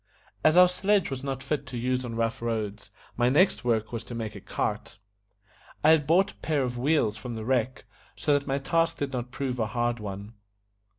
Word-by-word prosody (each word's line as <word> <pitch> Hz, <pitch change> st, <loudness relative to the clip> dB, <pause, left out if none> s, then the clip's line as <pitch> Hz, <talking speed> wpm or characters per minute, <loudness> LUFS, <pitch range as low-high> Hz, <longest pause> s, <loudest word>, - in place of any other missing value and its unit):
As 155 Hz, +2 st, +5 dB
our 180 Hz, 0 st, +9 dB
sledge 190 Hz, -1 st, +1 dB
was 135 Hz, 0 st, -4 dB
not 135 Hz, -1 st, -3 dB
fit 150 Hz, -4 st, -2 dB
to 125 Hz, -1 st, -5 dB
use 125 Hz, +2 st, 0 dB
on 120 Hz, -2 st, -5 dB
rough 115 Hz, 0 st, -1 dB
roads, 110 Hz, -3 st, -3 dB, 0.3 s
my 120 Hz, +1 st, +3 dB
next 175 Hz, +5 st, +3 dB
work 110 Hz, -3 st, 0 dB
was 115 Hz, -1 st, -4 dB
to 120 Hz, -, -7 dB
make 110 Hz, -2 st, -4 dB
a -, -, -8 dB
cart. -, -, -3 dB, 0.9 s
I 155 Hz, -, +7 dB
had 150 Hz, -3 st, +4 dB
brought 190 Hz, +5 st, +4 dB
a -, -, -23 dB
pair 150 Hz, -4 st, 0 dB
of 125 Hz, -1 st, -3 dB
wheels 120 Hz, -4 st, +1 dB
from 120 Hz, -2 st, -6 dB
the 110 Hz, -1 st, -5 dB
wreck, 130 Hz, 0 st, 0 dB, 0.3 s
so 150 Hz, -, +1 dB
that 140 Hz, 0 st, 0 dB
my 135 Hz, 0 st, 0 dB
task 165 Hz, +4 st, +1 dB
did 140 Hz, -1 st, -3 dB
not 125 Hz, -1 st, -3 dB
prove 130 Hz, -2 st, -3 dB
a 110 Hz, -, +1 dB
hard 120 Hz, +1 st, -1 dB
one. 100 Hz, +1 st, -7 dB
125 Hz, 215 wpm, -27 LUFS, 115-150 Hz, 0.9 s, our